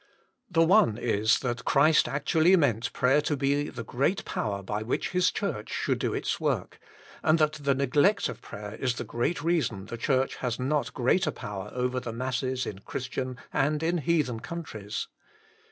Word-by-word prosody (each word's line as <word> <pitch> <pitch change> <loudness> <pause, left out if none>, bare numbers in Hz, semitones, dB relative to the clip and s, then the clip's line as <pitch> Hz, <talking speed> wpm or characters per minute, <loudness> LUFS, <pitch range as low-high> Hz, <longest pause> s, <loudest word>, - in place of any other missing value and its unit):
The 165 -3 +4
one 165 - +4
is 110 -2 +2
that 125 -1 -2
Christ 155 +3 +4
actually 160 +5 +3
meant 125 - +1
prayer 135 +4 +3
to 145 0 -1
be 140 +2 +1
the 120 - -6
great 140 - 0
power 100 -2 -3
by 105 +2 -3
which 110 +3 -2
His 180 0 +3
Church 155 - -3
should - - -1
do - - 0
its - - -2
work, - - -2 0.4
and 155 +1 +4
that 155 -1 +2
the 140 -1 +2
neglect 145 +10 +3
of - - -7
prayer 105 0 -8
is 125 +2 -1
the - - -4
great 145 +6 -2
reason 155 - 0
the 120 - -6
Church 130 +2 0
has 125 -2 -2
not 140 +3 -1
greater 145 +9 +2
power 105 0 -6
over 125 0 0
the 120 -2 -6
masses 130 +1 -2
in 95 - -6
Christian 130 +3 -4 0.2
and 150 +2 +1
in 170 +1 +1
heathen 150 -6 +1
countries. 110 -11 -5
130 Hz, 175 wpm, -28 LUFS, 115-155 Hz, 0.4 s, The